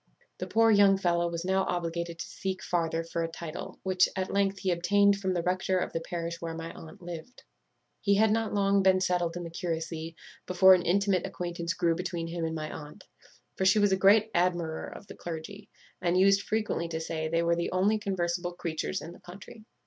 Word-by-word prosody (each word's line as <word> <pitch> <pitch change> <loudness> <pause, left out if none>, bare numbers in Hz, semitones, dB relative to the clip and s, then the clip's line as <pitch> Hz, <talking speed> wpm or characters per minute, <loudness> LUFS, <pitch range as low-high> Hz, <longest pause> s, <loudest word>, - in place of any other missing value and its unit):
"The - - -4
poor 225 0 +4
young 200 -2 +6
fellow 175 -2 +1
was 170 +1 -4
now 190 +1 +2
obliged 170 -1 -2
to 170 0 -7
seek 190 -1 -5
farther 165 -1 -1
for 165 0 -3
a 165 - 0
title, 165 0 -8
which, 185 -1 +3
at 190 0 -3
length, 195 0 +1
he 190 -1 -1
obtained 200 +3 +3
from 190 -2 -1
the 170 - -1
rector 185 +1 0
of 180 - -2
the 165 - -1
parish 170 0 -5
where 165 -1 -4
my 165 0 -6
aunt 160 +2 -12
lived. 175 +8 -9 0.6
"He 200 -1 +2
had 215 +1 +4
not 225 0 0
long 200 -1 +2
been 190 -1 +4
settled 175 -2 0
in 175 - -5
the 170 - -7
curacy 165 -1 -4 0.3
before 185 +1 +7
an 180 - +4
intimate 190 +1 +1
acquaintance 170 -1 -4
grew 170 -1 +2
between 175 -1 -3
him 165 0 -3
and 160 0 -3
my 155 -1 -4
aunt; 150 +6 -10 0.5
for - - -2
she 190 +2 +5
was 205 -1 +4
a - - +4
great 205 +3 +4
admirer 170 -2 0
of - - -10
the - - -10
clergy, 175 +5 -8 0.3
and 175 0 +1
used 195 +1 +5
frequently 215 -6 -1
to 160 -1 -4
say 160 -1 -3
they 165 +1 +1
were 170 0 +2
the 170 - -2
only 200 +4 +2
conversible 175 -3 -2
creatures 170 +2 -3
in 165 - -8
the - - -14
country. 200 +4 -12
175 Hz, 210 wpm, -29 LUFS, 170-195 Hz, 0.6 s, before